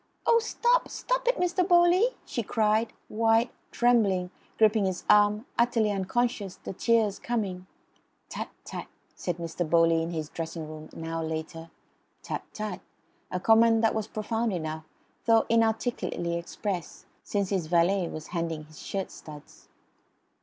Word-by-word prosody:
"Oh, 465 - +5
stop! 480 +2 +1
Stop - - -2
it, - - +4
Mr. 360 +1 +1
Bowley!" 355 +7 +5
she 245 - -2
cried, 220 +1 +1 0.2
white, 225 +2 +2 0.2
trembling, 200 -7 +2 0.3
gripping 215 -2 +4
his 185 -1 -2
arm, 210 +2 +4
utterly 235 -3 +3
unconscious, 200 0 -1
the - - -7
tears 220 -1 +2
coming. 195 -6 -3 0.6
"Tut - - -5 0.2
tut!" - - -6 0.3
said 175 -2 -3
Mr. 170 -1 -3
Bowley 165 0 +4
in 165 - -2
his 160 -3 -3
dressing 165 -1 -5
room 155 0 -9
an 165 - -8
hour 165 0 -3
later. 160 +1 -5 0.5
"Tut - - -3
tut!" 210 -4 -5 0.5
a 180 - -2
comment 225 +2 +5
that 225 - +4
was 220 -1 -2
profound 225 +1 -2
enough, 160 -3 -4 0.4
though 225 -1 +5
inarticulately 225 -6 0
expressed, 175 0 -4 0.2
since 200 -2 -1
his 185 -5 -1
valet 175 +2 +3
was 155 -1 -7
handing 165 -3 -2
his 155 -1 -15
shirt 195 -1 -4
studs. 150 -2 -13
200 Hz, 145 wpm, -28 LUFS, 170-230 Hz, 0.6 s, Oh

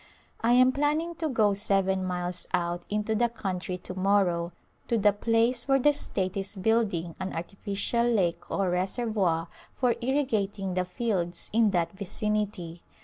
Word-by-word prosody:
I 235 +1 +3
am 255 +1 +6
planning 300 +5 0
to 315 - -1
go 215 -6 +3
seven 195 -1 +1
miles 180 -1 -2
out 175 0 -2
into 210 +1 -1
the 235 +2 +2
coun 195 -5 -4
try 180 0 -4
to 180 0 -8
morrow 185 -3 +1 0.4
to 235 - +1
the 205 -1 +4
place 230 +4 +1
where 270 0 +4
the 295 +3 +4
state 190 -9 -2
is 195 +1 -1
building 195 -5 0
an 190 0 -4
artificial 200 +6 -1
lake 175 -7 0
or 195 -2 0
reservoir 185 -3 0 0.3
for 250 -2 +2
irrigating 220 -8 -1
the 180 0 0
fields 180 -4 -2
in 225 -1 +4
that 175 -4 0
vicinity. 200 -3 -3
200 Hz, 155 wpm, -27 LUFS, 180-230 Hz, 0.4 s, am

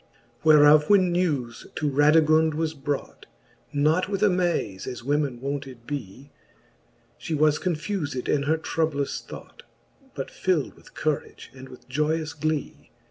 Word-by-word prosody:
XXV. - - -29
Whereof 150 -1 +6
when 190 -3 +5
newes 145 -10 -1
to 150 - -1
Radigund 155 +2 +4
was 160 0 -1
brought, 145 -1 -5 0.4
Not 155 +6 +1
with 200 0 -1
amaze, 175 - 0
as 125 -2 -6
women 140 -2 -1
wonted 135 -3 -5
bee. 135 -1 -7 0.9
She 160 - -3
was 150 0 +3
confufed 160 -5 -3
in 145 - +2
her 160 - +3
troublous 155 -3 -2
thought. - - -12 0.5
But 135 - -5
fild 180 -7 -1
with - - -20
courage 155 -5 -3
and 130 0 -12
with 125 - -14
joyous 150 +3 -1
glee. 155 - -3
150 Hz, 135 wpm, -25 LUFS, 140-160 Hz, 0.9 s, Whereof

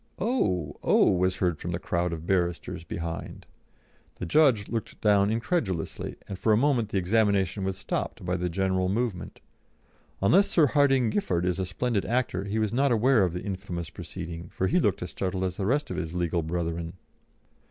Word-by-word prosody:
"Oh! 90 - 0
Oh!" - - +4
was 95 0 +1
heard 90 -5 0
from 85 - -5
the - - 0
crowd 85 0 -1
of 80 -1 -5
barristers 85 -2 -1
behind. 85 0 -6 0.7
The - - -5
judge 125 - +4
looked 115 -2 -4
down 100 -1 +4
incredulously, 115 - -2
and 95 -1 -6
for 110 - +2
a 105 - +5
moment 125 -4 +2
the 100 - -1
examination 100 0 +1
was 95 0 -2
stopped - - -4
by 90 0 0
the 90 0 -1
general 95 +1 0
movement. 105 -3 -3 0.8
Unless 180 - +4
Sir 160 - +4
Hardinge 135 -4 +3
Giffard 90 - 0
is 90 0 0
a 95 - -1
splendid 105 +2 -1
actor, 115 -6 -1
he 100 +2 -2
was 110 0 0
not 135 +2 +2
aware 120 -1 +4
of 90 -3 0
the 90 - -5
infamous 95 -4 -5
proceeding, 85 -1 -7
for 95 - -2
he 95 - +3
looked - - +1
as - - -6
startled 95 -1 -2
as 90 -1 -2
the 100 - -1
rest 145 +5 0
of - - -3
his 85 -1 -4
legal 85 -1 0
brethren. 85 0 -3
95 Hz, 185 wpm, -27 LUFS, 90-115 Hz, 0.8 s, a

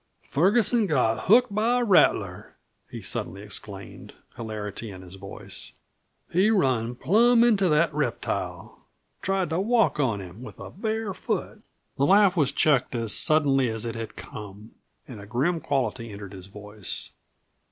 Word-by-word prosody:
"Ferguson 210 - +3
got 125 -8 +1
hooked 235 +2 +5
by 230 +4 +2
a - - +1
rattler!" 200 -6 +2 0.3
he - - -8
suddenly 100 +1 -3
exclaimed, 100 -1 -8 0.2
hilarity 110 -1 -5
in 95 -2 -10
his 90 0 -13
voice. 95 0 -5 0.6
"He 190 +5 +3
run 130 - +1
plum 230 - +4
into 205 -6 +3
that 155 +1 +3
reptile; 150 0 -3 0.3
tried 190 -3 -1
to 165 - 0
walk 225 -3 +2
on 115 -8 +1
him 95 +3 -10
with 125 - -10
a - - -8
bare 220 0 -3
foot." - - -4 0.4
The 140 - +2
laugh 200 -1 +5
was 145 -5 +2
checked 135 -4 +2
as 115 -2 -1
suddenly 140 -5 +2
as 110 +1 -4
it 115 - -3
had 115 -1 -6
come, 105 +1 -10 0.4
and 115 -6 -9
a 100 - -11
grim 145 - 0
quality 130 -6 -2
entered 100 -1 -9
his 95 -1 -10
voice. 105 0 -6
135 Hz, 150 wpm, -26 LUFS, -, 0.6 s, hooked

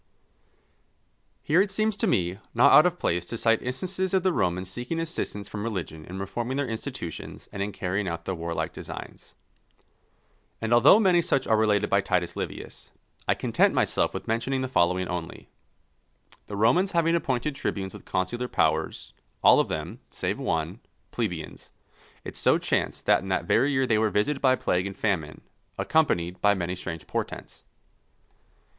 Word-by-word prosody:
_ - - -43 1.4
Here 165 +5 +4
it 200 - +1
seems 215 +2 0
to - - +1
me 90 +1 0 0.2
not 135 +5 +6
out 155 - +8
of 180 0 -2
place 90 - 0
to 115 - -4
cite 115 0 +2
instances 185 +9 -2
of 185 - +2
the 185 -2 +2
Romans 90 - 0
seeking 125 - -4
assistance 160 -11 -4
from 105 - -6
religion 90 -8 -4
in 90 - -8
reforming 120 +7 -3
their 140 -2 0
institutions 115 - -6
and 100 - -4
in 100 +1 -2
carrying 95 +1 -2
out 85 -1 -4
their 95 - -2
warlike 85 -1 -3
designs. - - -9 1.2
And 115 +1 0
although 125 - +7
many 185 -5 +4
such 165 -5 0
are 110 - +3
related 105 -1 +2
by 100 - +4
Titus 90 -2 -1
Livius, - - -6 0.4
I - - +3
content - - +2
myself - - +1
with - - -6
mentioning 120 +4 0
the 130 - -1
following 90 -6 +1
only: 90 -2 -6 1.0
The 105 - -6
Romans 175 - +3
having 165 -1 +3
appointed 150 -3 0
tribunes 95 -8 -3
with - - -11
consular 120 +7 -2
powers, 80 -7 0 0.3
all - - +7
of - - +2
them, - - -5
save - - -3
one, 80 +6 -2 0.3
plebeians, 90 -9 -4 0.5
it - - -8
so - - +3
chanced - - -1
that - - +4
in 95 - -8
that 95 -2 0
very 130 +10 +3
year 130 -1 +2
they 110 -4 +2
were 110 0 +2
visited 135 +8 0
by 130 -1 +5
plague 90 -5 0
and 95 -1 -8
famine, 85 -9 -1 0.4
accompanied 90 - +1
by 100 0 +4
many 90 -1 -2
strange 80 -4 -6
portents. - - -5
110 Hz, 170 wpm, -26 LUFS, 90-135 Hz, 1.4 s, out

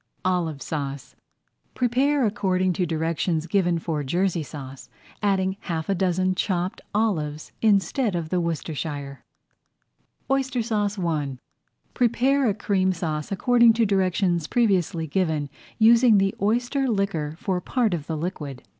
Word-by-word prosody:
OLIVE 170 -6 0
SAUCE 140 -3 -5 0.6
Prepare 260 +3 +2
according 185 -4 +1
to 180 -1 -1
directions 160 0 -1
given 175 -1 +1
for 160 -3 -3
Jersey 175 +4 0
Sauce, 135 -3 -9 0.3
adding 190 -2 +1
half 160 -2 -4
a - - +3
dozen 185 0 +1
chopped 185 0 -2
olives 155 -9 -1
instead 210 +1 +2
of 165 -2 -3
the 180 0 +1
Worcestershire. 150 -4 -4
[Page - - -47
32] - - +2
OYSTER 265 -2 0
SAUCE 210 -3 -1
I 145 -5 -1 0.6
Prepare 255 +2 +2
a 200 - 0
Cream 195 -3 +1
Sauce 155 -3 -3
according 235 +3 +5
to 225 0 +2
directions 185 -4 +1
previously 190 -8 +1
given, 155 -3 -1 0.3
using 230 0 +6
the 195 0 +2
oyster 245 +6 +1
liquor 195 -9 -1
for 185 -1 -2
part 230 0 0
of 155 -4 -4
the 160 - -2
liquid. 150 -6 -5
185 Hz, 135 wpm, -24 LUFS, 160-215 Hz, 0.6 s, using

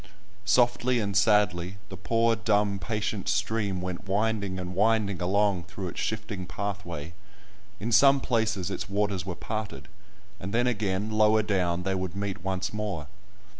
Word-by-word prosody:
Softly 120 +3 +3
and 100 -3 -2
sadly 100 -3 +3
the 95 - -7
poor, 115 +5 +2
dumb, 105 -2 +1
patient 105 +2 -2
stream 100 -3 0
went 90 +2 -5
winding 100 -2 0
and 90 0 -5
winding 105 -1 +2
along 95 -1 +2
through 95 +1 -6
its - - -7
shifting 105 -4 -3
pathway; 90 -7 -5 0.7
in 115 +3 -3
some 135 +6 +6
places 110 -8 0
its 100 - -4
waters 100 -3 -1
were 90 - -3
parted, 105 -12 -5 0.5
and 95 +3 -4
then 120 +1 +3
again, 105 -3 -1
lower 110 0 +4
down, 90 -4 0
they 95 +1 0
would 95 -1 -3
meet 100 -2 -4
once 95 0 -2
more. 105 -8 -3
100 Hz, 150 wpm, -27 LUFS, 95-110 Hz, 0.7 s, some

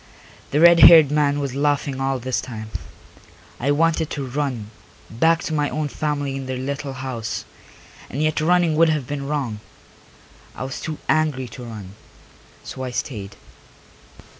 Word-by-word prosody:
The 145 - +1
red 170 +1 +7
haired 160 -5 +9
man 145 -1 +2
was 140 -3 -3
laughing 140 -1 0
all 135 0 0
this 130 +1 -2
time. 110 -3 -8 0.9
I 135 - -1
wanted 160 +1 +2
to 140 -3 -4
run, 125 -5 -3 0.4
back 165 +9 +2
to 160 - -3
my 150 -1 +1
own 150 -1 -2
family 145 -2 -2
in 135 -1 -5
their 130 -1 -3
little 140 +1 -4
house, 130 -4 -5 0.6
and 135 - -5
yet 155 0 +1
running 170 0 +3
would 165 0 +5
have 150 -4 0
been 140 +1 -4
wrong; 135 -8 -2 1.0
I - - -5
was 135 +1 -5
too 155 -1 -4
angry 150 -5 +1
to 125 +2 -9
run, 105 -5 -9 0.7
so 130 - -8
I 130 - -3
stayed. 105 -5 -5
140 Hz, 160 wpm, -22 LUFS, 130-155 Hz, 1.0 s, haired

